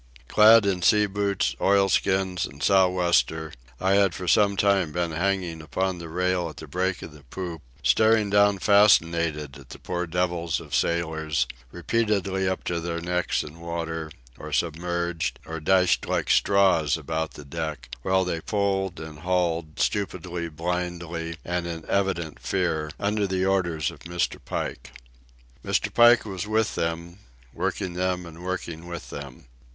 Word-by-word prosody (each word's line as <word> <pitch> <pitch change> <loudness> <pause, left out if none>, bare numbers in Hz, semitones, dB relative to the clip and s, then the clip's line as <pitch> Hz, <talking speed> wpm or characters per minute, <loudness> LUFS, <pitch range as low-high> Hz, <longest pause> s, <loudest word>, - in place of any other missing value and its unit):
Clad 110 - +7
in 95 -2 0
sea 105 +4 +5
boots, 100 -1 -1
oilskins 95 -2 +2
and 70 +2 -10
sou'wester, 90 -4 +2 0.3
I 95 - +1
had 100 -3 +3
for 90 - -6
some 100 +2 +4
time 100 -5 +2
been 85 +1 -1
hanging 90 -1 -1
upon 95 +4 -2
the 85 -1 -8
rail 90 0 0
at 75 - -12
the 80 - -8
break 90 +5 -2
of - - -8
the 75 -1 -15
poop, 85 +2 -6 0.2
staring 110 - +3
down 100 0 +4
fascinated 85 - +3
at - - -16
the - - -9
poor 90 -1 -3
devils 85 -1 -1
of - - -11
sailors, 80 -3 0 0.3
repeatedly 95 -1 0
up 95 - -3
to 85 -1 -2
their 85 0 -3
necks 90 +1 -1
in 75 +3 -11
water, 85 -1 -4 0.3
or 75 - -8
submerged, 85 +1 -1
or 80 0 -5
dashed 90 +3 +2
like - - 0
straws 95 -7 +3
about 80 0 -3
the 75 - -10
deck, 75 -5 -5
while 95 +5 +2
they 85 -2 -2
pulled 95 -2 -1
and 80 -1 -9
hauled, 85 -2 -1
stupidly, 90 -4 -2
blindly, 85 0 -4
and 90 0 -2
in 80 -2 -6
evident 90 -5 -1
fear, 85 -5 -1
under 105 0 0
the 95 0 0
orders 85 -5 0
of 80 - -14
Mr. 85 +3 -2
Pike. - - -5 0.7
Mr. - - 0
Pike 120 0 +6
was 95 -1 -5
with 110 0 +1
them, 85 +2 -3 0.3
working 90 -2 -2
them 90 0 -1
and 85 +1 -11
working 85 -2 -5
with 85 -1 -7
them. 70 -4 -9
90 Hz, 155 wpm, -25 LUFS, 80-95 Hz, 0.7 s, Clad